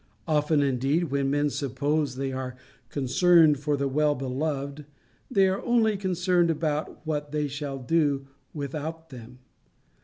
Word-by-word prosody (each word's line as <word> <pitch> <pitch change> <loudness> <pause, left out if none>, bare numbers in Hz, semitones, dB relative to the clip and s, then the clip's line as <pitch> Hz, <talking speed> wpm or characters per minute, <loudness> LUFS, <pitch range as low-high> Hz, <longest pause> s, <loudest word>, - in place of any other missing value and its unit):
Often, 150 -1 +2
indeed, 140 +4 0
when 140 -1 +1
men 145 +1 +1
suppose 140 +1 -1
they 135 0 -2
are 130 -1 -5 0.3
concerned 155 +2 +4
for 145 0 0
the 140 0 0
well 150 +2 +2
beloved, 140 +2 -3 0.4
they 195 -7 +4
are 190 +1 -1
only 230 -3 +2
concerned 180 -2 +1
about 155 -1 -2
what 150 -2 -3
they 150 -1 0
shall 140 0 -5
do 140 0 +1 0.3
without 155 +3 -5
them. 125 0 -11
145 Hz, 135 wpm, -26 LUFS, 135-160 Hz, 0.4 s, concerned